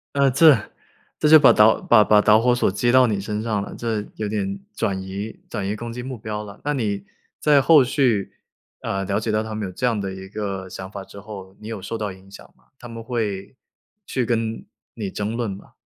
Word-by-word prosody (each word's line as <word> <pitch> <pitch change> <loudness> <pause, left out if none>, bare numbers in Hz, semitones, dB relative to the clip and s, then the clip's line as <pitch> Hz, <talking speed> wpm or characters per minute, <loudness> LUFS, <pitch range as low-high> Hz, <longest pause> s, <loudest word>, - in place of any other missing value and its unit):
呃， 140 -1 +4
这， 145 0 +6 0.6
这 150 - +3
就 155 +1 +10
把 140 -4 +7
导 110 +1 +5
把 120 -3 +5
把 105 0 +5
导 105 +1 +5
火 125 +1 +3
索 120 - +1
接 120 +5 +1
到 130 0 +6
你 105 -3 -1
身 105 +2 -3
上 105 -3 -1
了， - - -8
这 110 -3 -2
有 105 - -3
点 100 -2 -2 0.2
转 95 -2 -1
移 95 +3 -6
转 105 -4 -4
移 105 - -2
攻 115 +1 -6
击 125 - -6
目 130 -1 -6
标 105 -1 -5
了。 100 -1 -11
那 145 - 0
你 100 -6 -2 0.3
在 145 -2 +4
后 155 -3 +6
续， 125 -7 +1 0.5
呃， 95 0 -2
了 100 +2 -1
解 110 0 -2
到 110 0 +1
他 110 0 -6
们 105 - -3
有 - - -9
这 125 - -2
样 115 -4 0
的 95 -1 -4
一 95 0 -9
个 95 -2 -5
想 95 +1 -8
法 100 -1 -7
之 100 - -12
后， 100 -2 -10
你 110 - -9
有 110 -4 -5
受 115 - -5
到 105 -3 -3
影 95 +1 -14
响 100 - -12
吗？ - - -31
他 120 - -10
们 115 -1 -8
会 110 -3 -3 0.5
去 125 - -1
跟 115 -1 -2 0.3
你 105 -4 -4
争 105 +3 -3
论 120 -3 -2
吗？ 95 - -12
110 Hz, 250 characters per minute, -22 LUFS, 100-120 Hz, 0.6 s, 就